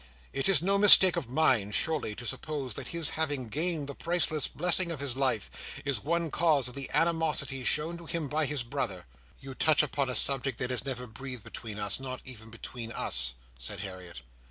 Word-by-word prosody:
It 135 +6 +1
is 190 -3 +4
no 195 +2 +1
mistake 190 -3 +10
of 120 - -5
mine, 130 -7 +1
surely, 155 -4 -1
to 120 - -9
suppose 135 +1 -5
that - - -6
his 170 -3 +1
having 145 -6 -2
gained 155 +1 -1
the 140 - -6
priceless 165 -1 0
blessing 175 +2 +2
of 165 -4 -2
his 140 -3 -2
life, 130 -7 -1 0.3
is 140 -6 -1
one 170 0 -2
cause 150 -6 +1
of 125 - -6
the 135 0 -6
animosity 160 -5 0
shown 160 +6 +1
to 170 - -13
him 165 -3 -3
by 150 +1 0
his 145 -3 -2
brother." 120 - -5 0.4
"You 135 0 -9
touch 155 +2 +2
upon 140 -2 -2
a 125 - -2
subject 135 0 +2
that 125 0 -3
is 125 -1 -3
never 125 -2 -5
breathed 125 0 -9
between 110 -3 -9
us; 105 +1 -2
not 130 -1 -7
even 115 -4 -10
between 115 +1 -9
us," 60 - +1 0.3
said 90 +11 -4
Harriet. 90 -7 -9
135 Hz, 200 wpm, -28 LUFS, 120-160 Hz, 0.4 s, mistake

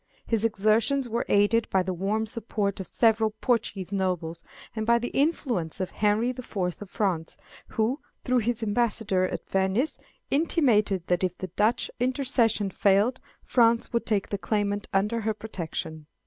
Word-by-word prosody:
His 225 -2 0
exertions 225 +5 +2
were 235 +1 -2
aided 205 +3 +3
by 190 -1 +2
the 185 0 -2
warm 200 +5 -1
support 210 -3 -2
of 190 - -5
several 220 -2 +2
Portuguese 215 -6 -1
nobles, 180 -4 -2 0.3
and 220 - -2
by 235 +2 +4
the 240 +1 -3
influence 255 - 0
of 185 -1 -3
Henry 215 +4 +1
the 255 0 -7
Fourth 185 -7 -3
of 205 - -8
France, 180 -7 -2 0.3
who, 230 +6 0 0.2
through 250 0 +2
his 235 0 -1
ambassador 215 -3 +1
at - - -6
Venice, 195 +9 0 0.3
intimated 225 - +2
that 180 0 +1
if 180 -1 -1
the 185 - -5
Dutch 210 +7 +1
intercession 245 -5 +1
failed, 205 +7 +2 0.2
France 235 -2 +2
would 235 - 0
take 210 -3 +1
the 200 - -3
claimant 205 -1 -1
under 210 +4 +1
her 220 0 -1
protection. 160 -7 -6
215 Hz, 160 wpm, -26 LUFS, 195-235 Hz, 0.3 s, by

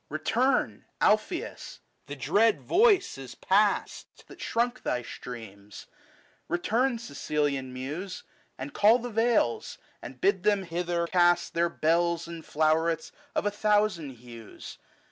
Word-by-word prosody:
Return, 155 - 0
Alpheus; - - 0 0.3
the 145 - -6
dread 200 - +2
voice 395 - +3
is 130 -2 -9
past 205 +2 0
That - - -14
shrunk 240 +2 -1
thy 125 -1 -2
streams; 105 -5 -10 0.6
return 230 +9 0
Sicilian 145 - -2
Muse, 150 +9 -6 0.3
And 135 +2 -7
call 215 +3 +5
the 245 0 -6
vales, 225 - +1 0.2
and 130 - -10
bid 195 +3 +2
them 205 0 +2
hither 170 0 -2
cast 175 0 +2
Their 170 0 +1
bells 170 +1 +1
and 170 -1 -8
flowerets 160 +2 +1 0.2
of - - 0
a 205 - +1
thousand 205 -8 +1
hues. 115 -2 -11
170 Hz, 125 wpm, -28 LUFS, 140-210 Hz, 0.6 s, call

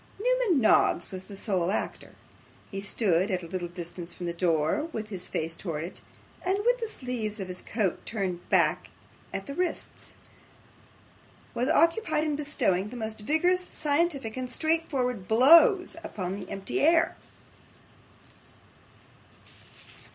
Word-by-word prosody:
Newman - - +2
Noggs 215 -6 +3
was 190 0 -6
the 200 - -10
sole 185 -4 0
actor. 200 - -3 0.6
He 195 -1 -4
stood 195 -2 +1
at 185 -2 -1
a - - -7
little 175 0 -3
distance 175 0 -7
from 175 - -6
the 170 - -2
door, 170 - +1
with 220 -10 -6
his 185 -4 -6
face 160 +1 -2
towards 165 0 -5
it; - - -21 0.4
and 375 +2 +1
with - - +3
the 455 - -2
sleeves 240 - -4
of 190 - -4
his 180 0 -6
coat 205 -6 -1
turned 190 -6 -4
back - - +2 0.4
at 195 - -4
the 280 - -6
wrists, 360 +4 -4 1.4
was 250 +4 0
occupied 330 0 +3
in 305 -2 0
bestowing 210 -10 0
the 250 - -8
most 220 -1 -5
vigorous, 355 +10 +1
scientific, 290 -6 0
and 255 -1 -4
straightforward 260 - -1
blows 335 - +6
upon 185 -2 -4
the 200 - -8
empty 195 0 -3
air. 330 +2 +4
220 Hz, 140 wpm, -28 LUFS, -, 1.4 s, blows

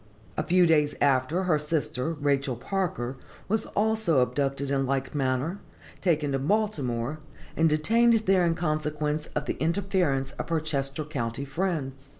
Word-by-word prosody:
A - - 0
few 180 +3 +4
days 150 -3 +3
after, 140 +6 +2
her 165 -5 +2
sister, 150 -1 -1
Rachel 140 -3 0
Parker, 135 -4 -3 0.3
was 220 +2 0
also 215 -9 +2
abducted 135 +2 -1
in 135 -1 +1
like 135 0 -1
manner, 140 +6 -1 0.4
taken 155 -6 +1
to 135 - 0
Baltimore, 145 - -1 0.4
and 165 0 +3
detained 225 +9 +3
there 185 -1 +4
in 170 -1 +2
consequence 150 -2 -1
of 145 - -1
the - - -3
interference 165 -6 0
of - - -4
her 165 -1 +1
Chester 140 -1 0
county 135 -3 -3
friends. 140 -4 -3
150 Hz, 150 wpm, -27 LUFS, 135-175 Hz, 0.4 s, few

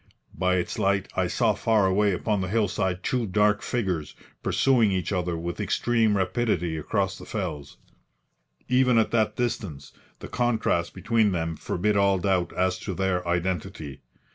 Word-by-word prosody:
By 90 +1 +1
its 90 -1 -2
light 100 0 +1
I - - +1
saw - - +2
far 110 -3 +2
away 100 +2 +3
upon 100 +2 -1
the 95 - -2
hillside 95 -3 0
two 125 -3 0
dark 105 +1 +2
figures 90 -11 -2 0.3
pursuing 120 -6 +3
each 95 +1 -1
other 90 -2 -1
with 85 +1 -5
extreme 115 -4 +1
rapidity 95 -4 0
across 95 +4 -2
the - - -10
fells. 80 -9 -5 0.9
Even 125 -1 +3
at 110 - +2
that 110 -2 +1
distance 95 - -3 0.2
the - - -9
contrast 115 -8 0
between 110 -4 +2
them 80 -1 -2
forbid 105 +6 -1
all 100 -1 +3
doubt 90 -2 0
as 95 0 0
to 95 -2 -5
their 90 -2 -1
identity. 85 -4 -3
95 Hz, 155 wpm, -26 LUFS, 90-110 Hz, 0.9 s, away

